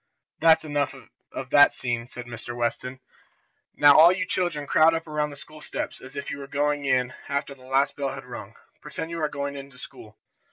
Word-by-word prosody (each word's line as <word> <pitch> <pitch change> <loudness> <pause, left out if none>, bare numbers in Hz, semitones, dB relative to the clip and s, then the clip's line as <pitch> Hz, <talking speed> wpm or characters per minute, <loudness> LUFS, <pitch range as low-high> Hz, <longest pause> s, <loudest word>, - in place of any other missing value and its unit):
"That's 160 0 +5
enough 145 -2 -1 0.4
of 130 -1 -7
that 145 0 +7
scene," 120 -1 -3
said 125 -1 -9
Mr. 120 0 -8
Weston. 125 +2 -3 0.7
"Now 145 -1 +7
all 165 +3 +9
you 185 +1 -1
children 175 -6 -1
crowd 160 +3 +4
up 165 - -3
around 150 -1 -1
the 145 - -10
school 150 +3 -13
steps, - - -5
as 135 +2 -12
if 140 - -5
you 140 - -5
were 140 - -8
going 145 0 0
in 130 -1 +1 0.2
after 140 0 -2
the 130 -2 -17
last 135 +2 +1
bell 140 -1 -2
had 135 -1 -8
rung. 125 -1 -9 0.3
Pretend 160 - -6
you 170 -1 -4
are 155 - +1
going 140 -1 -4
into 140 -2 -10
school." - - -11
140 Hz, 205 wpm, -25 LUFS, 130-150 Hz, 0.7 s, all